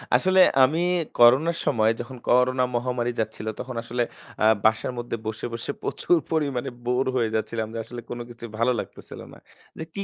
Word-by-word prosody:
আসলে 185 0 +3 0.2
আমি 155 +6 +3 0.4
করোনার 135 +8 +6
সময় 110 -1 +3
যখন 125 +2 -7
করোনা 125 +1 +4
মহামারী 120 0 -1
যাচ্ছিল 110 0 -3
তখন 125 -1 -6
আসলে 120 +1 -1 0.4
আ - - +5 0.2
বাসার 110 +3 +2
মধ্যে 120 -1 -3
বসে, 110 0 -4
বসে 115 +4 -4
প্রচুর 175 - +1
পরিমাণে 140 -5 -1 0.2
বোর 125 +2 +1
হয়ে 115 -3 +1
যাচ্ছিলাম 110 0 -2
যে - - -5
আসলে 120 -1 -8
কোন 120 - -5
কিছু 120 0 -9
ভালো 115 +2 +3
লাগতেছিল - - -9
না। - - -13 0.4
যে - - -5
কি 200 - -3
120 Hz, 175 wpm, -25 LUFS, 115-130 Hz, 0.4 s, করোনার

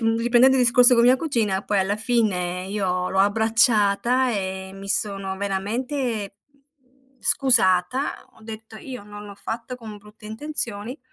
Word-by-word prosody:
uhm, 225 0 +1
riprendendo 240 +3 +4
il 255 - +3
discorso 245 +1 +7
con 235 - +3
mia 250 +2 +5
cugina, 225 -10 -1
poi, 205 - 0
alla 195 +2 -1
fine, 190 -6 -1
io 185 -3 -2
l'ho 190 - -2
abbracciata 225 +3 +2
e 190 -3 -4
mi 195 0 -10
sono 195 -1 -2
veramente, 210 +2 -3 0.2
mhmm, 270 -2 -37
scusata. 240 -1 +1
Ho - - -21
detto: 220 0 -10
“Io 250 +1 -9
non 205 0 -11
l'ho 200 - -10
fatto 230 +4 -6
con 220 -3 -10
brutte 210 +1 -16
intenzioni, 235 -1 -3
220 Hz, 150 wpm, -22 LUFS, 200-250 Hz, 0.2 s, discorso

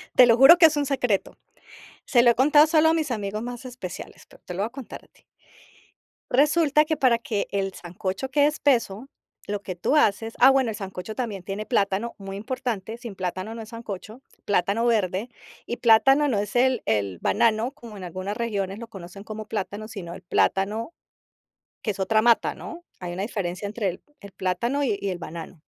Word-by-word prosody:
Te 255 - +9
lo 230 -1 +4
juro 270 +7 +9
que 340 - +7
es 315 -1 +4
un 290 - +1
secreto. 250 -7 -1 0.7
Se 240 -4 +4
lo 240 - +7
he - - -1
contado 295 +4 +5
solo 320 0 +4
a - - +3
mis 315 -4 -1
amigos 210 -2 -3
más 245 +1 -7
especiales, 245 -8 -8
pero - - -19
te 180 - -6
lo 180 - -6
voy 210 - 0
a - - -14
contar 260 -2 -9
a - - -22
ti. - - -29 1.1
Resulta 300 +2 +4
que 315 +1 0
para 255 -5 +3
que 220 -3 -3
el 195 -1 -1
sancocho 185 +8 -5
quede 285 +1 +4
espeso, 260 -6 0 0.4
lo 205 -1 -3
que 185 - -5
tú 180 - +1
haces 225 -3 +2
ah, 260 - +8
bueno, 265 -3 +3
el 220 - -4
sancocho 190 +1 -6
también 215 -6 -4
tiene 195 +3 -5
plátano, 210 0 0
muy 195 0 -7
importante, 225 -2 -4
sin 235 -4 -9
plátano 185 +3 -4
no 230 - -7
es 220 - -9
sancocho, 220 +1 -8 0.2
plátano 205 +3 +1
verde 210 -1 0 0.4
y 240 - -4
plátano 270 +6 +5
no 220 -6 +1
es 205 +2 -4
el 255 -1 +2
el 100 -4 0
banano, 230 +2 +2
como 235 -7 -12
en 185 - -7
algunas 185 +4 -5
regiones 200 -4 -2
lo 235 - -8
conocen 195 -2 -11
como 215 0 -7
plátano, 210 +1 -4
sino 185 -6 -7
el - - -10
plátano 205 - 0 0.9
que 220 - -1
es 195 - -5
otra 215 +3 +2
mata, 235 0 +3
¿no? 345 -2 -9 0.2
Hay 175 -1 -6
una 185 +2 -4
diferencia 200 -3 -4
entre 205 -1 -2
el 180 - -10 0.2
el 200 -1 -12
plátano 235 +11 -1
y 220 -8 0
y 200 - -1
el 180 - -4
banano. 165 0 -8
220 Hz, 205 wpm, -25 LUFS, 195-250 Hz, 1.1 s, Te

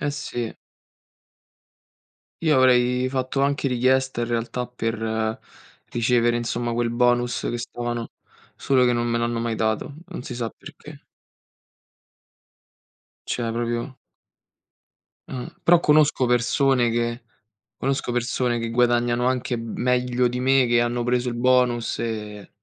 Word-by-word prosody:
eh 145 - -1
sì. 120 -5 -4 1.9
Io 155 -4 +4
avrei 125 0 +3
fatto 130 +1 -2
anche 140 0 +1
richiesta 130 0 +1
in - - -1
realtà 120 +1 -2
per 110 -2 -2 0.5
ricevere, 120 0 +2
insomma, 120 0 -2
quel 115 0 0
bonus 120 0 +1
che 120 - -2
stavano 120 -1 -4 0.5
solo 130 -2 +2
che 125 - +3
non 120 0 0
me 115 - 0
l'hanno 120 0 -1
mai 115 -1 -1
dato. 110 +6 -1
Non 180 -9 -7
si 125 - -6
sa 115 -2 -3
perché. - - -13 2.3
Cioè 115 -2 -2
proprio 120 +3 -3 1.3
Eh, 125 -2 -6
però 175 0 +6
conosco 150 -4 +3
persone 125 0 +2
che 120 +1 -1 0.5
conosco 135 -2 -1
persone 120 0 0
che 115 0 -3
guadagnano 120 0 +2
anche 125 -1 0
meglio 125 +2 0
di 125 +1 -3
me, 130 0 +4
che 120 0 +3
hanno 120 0 0
preso 125 0 0
il 120 - -3
bonus 125 -1 +2
e 105 -3 -5
120 Hz, 125 wpm, -23 LUFS, 120-125 Hz, 2.3 s, però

